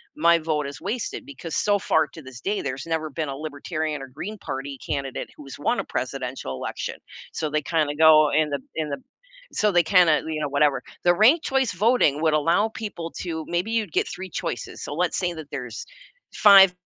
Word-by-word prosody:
my 170 +2 +4
vote 155 -2 -1
is 140 +2 -8
wasted 215 +8 -3
because 185 - -7
so, 205 -1 +3
far 160 -5 +2
to 160 +3 -12
this 130 -1 -11
day, 205 +1 -1
there's 135 +2 -4
never 160 -1 -1
been 155 -1 -3
a 135 - -4
Libertarian 155 0 -4
or 135 - -7
Green 205 +11 -7
Party 135 +1 -5
candidate 135 -2 -4
who's 140 -2 -10
won 240 +10 +1
a - - -1
presidential 125 - -4
election," 65 - -4 0.4
so, 155 - -2
they 155 +1 0
kinda 150 -2 0
go 155 -1 +7
end 150 -1 +1
up 135 - -5 0.2
end 155 -2 -2
up 140 - -4 0.5
so 210 -1 +2
they 175 -1 +4
kinda, 165 -4 +4
you 155 -1 -2
know, 150 - 0
whatever 140 -1 +2 0.2
the 175 0 +5
ranked 255 - +5
choice 265 -6 +1
voting 185 - +3
would 155 -1 +3
allow 170 +8 +3
people 205 -7 -6
to 160 -3 -4
maybe 175 +6 -1
you'd 220 -7 0
get - - +1
3 190 0 -7
choices. 120 - -4
So, - - -5
let's 180 +1 0
say 175 -1 -1
that 160 -3 -9
there's 125 -5 -6 0.5
5 195 -3 +8
160 Hz, 205 wpm, -24 LUFS, 145-185 Hz, 0.5 s, 5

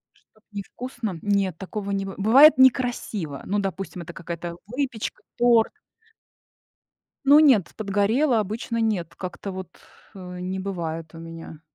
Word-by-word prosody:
Что-то 220 - -31
не 200 -1 -4
вкусно? 235 -6 -6
Нет, 200 -4 +1
такого 200 +1 -5
не 195 0 -1
быв 195 - -7
бывает 265 +9 +7
некрасиво. 245 - +2
Ну, 205 - 0
допустим, 195 -2 -4
это 170 +1 -9
какая-то 170 0 -6
выпечка, 250 -1 -4 0.2
торт. 235 -2 +4 1.5
Ну, 285 +2 +8
нет, 260 - +5
подгорела, 215 +5 +2
обычно 225 +3 -3
нет, 210 -7 -1
как-то 185 +2 -6
вот, 185 -1 -6 0.5
э, 180 -2 -8
не 185 +1 -3
бывает 165 -4 -4
у 165 - -9
меня. 165 -1 -9
200 Hz, 140 wpm, -24 LUFS, 180-230 Hz, 1.5 s, Ну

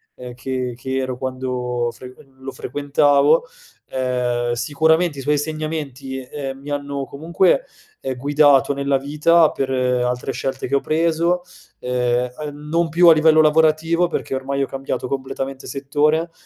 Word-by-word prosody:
ehm, 125 -1 -9
che 130 -1 -4
che 130 +2 -4
ero 130 -1 -2
quando 125 -2 -2
frequen 130 +2 -14
lo 135 +1 -7
frequentavo. 145 - +2 0.5
Ehm, 125 -2 -1
sicuramente, 155 +5 +1
i - - -4
suoi 150 +2 +1
insegnamenti, 145 -3 -4
ehm, 135 0 -6
mi 145 +1 -8
hanno 140 -1 -3
comunque, 170 - +1 0.4
ehm, 130 - -3
guidato 145 +1 +4
nella 140 0 0
vita 150 +4 +3
per 135 -1 -3
altre 125 0 0
scelte 130 0 -4
che 140 - 0
ho - - +4
preso, 170 +3 +1 0.4
ehm, 125 0 0 0.2
uhm, 145 +1 -11
non 165 +1 +1
più 170 +2 +4
a - - +9
livello 155 0 +5
lavorativo 160 +2 +3
perché 160 - -4
ormai 135 +1 -1
ho - - -2
cambiato 135 0 -4
completamente 135 0 -5
settore, 150 +4 0
140 Hz, 145 wpm, -20 LUFS, 130-155 Hz, 0.5 s, a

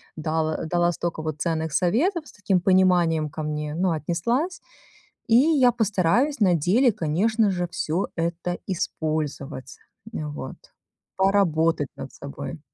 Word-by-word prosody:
дала 155 0 -1
дала 175 +1 +2
столько 170 -1 -3
вот 155 -1 -4
ценных 160 -2 -1
советов, 300 - +1
с - - -13
таким 195 -3 0
пониманием 175 -4 +3
ко 155 - -6
мне, 150 0 -3
ну, 180 +2 +1
отнеслась. 190 - -1 0.7
И 225 - +4
я 275 -3 +5
постараюсь 225 - +1
на 185 -3 +5
деле, 215 - +3
конечно 200 +7 +1
же, 175 -1 -2
всё 165 +5 -1
это 170 +1 -2
использовать, 155 -7 -3 0.4
м, 75 -1 -4
вот. 70 -2 -7 0.6
Поработать 165 -6 +2
над 135 - -8
собой. 140 +3 -7
170 Hz, 130 wpm, -24 LUFS, 155-200 Hz, 0.7 s, я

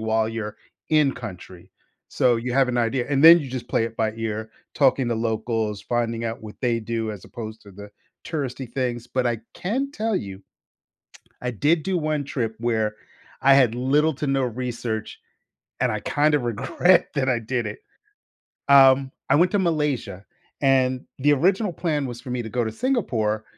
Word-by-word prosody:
while 110 0 +1
you're 110 -2 -5 0.3
in 150 -3 +4
country; 90 -6 -10 0.4
so 125 -2 +2
you 120 +2 -3
have 135 0 +3
an 125 -1 0
idea. 120 +1 0
And 140 -1 +1
then 165 +1 +11
you 140 - -6
just 125 -1 -5
play 115 - +1
it 115 0 -6
by 110 -1 0
ear, 110 -1 -4 0.2
talking 135 -3 +3
to 120 - 0
locals, 110 -2 -2
finding 115 -1 -1
out 115 0 -4
what 105 -1 -10
they 120 -2 0
do 115 0 -3
as 100 -3 -10
opposed 110 -1 -8
to 100 - -14
the 100 +2 -11 0.3
touristy 135 -5 -4
things. 120 -3 -2
But 125 0 -1
I 120 -1 0 0.2
can 260 +9 -2
tell 225 -4 -1
you, 100 - -4 1.0
I 125 - -2
did 150 +8 +1
do 190 +2 -1
one 155 -2 -1
trip 115 -5 -3
where 110 -2 0 0.5
I 135 0 +6
had 130 -5 +4
little 145 +6 +2
to 145 - -3
no 135 -1 +1
research, 120 -2 -4 0.6
and - - +2
I - - -3
kind 150 +1 +1
of 145 - +2
regret 145 - +2
that 135 -3 0
I 125 -2 +2
did 120 +2 -2
it. - - -6 0.9
Um, 135 -1 +6 0.2
I - - +5
went 175 +5 +4
to 205 - +2
Malaysia, 145 - -1 0.4
and 130 -2 +2
the 145 +2 +4
original 190 - +1
plan 155 -4 -1
was 120 -2 -7
for 130 - -10
me 125 0 -2
to 115 - -7
go 120 +1 0
to 110 - -3
Singapore, 110 - -1
125 Hz, 185 wpm, -23 LUFS, 115-145 Hz, 1.0 s, then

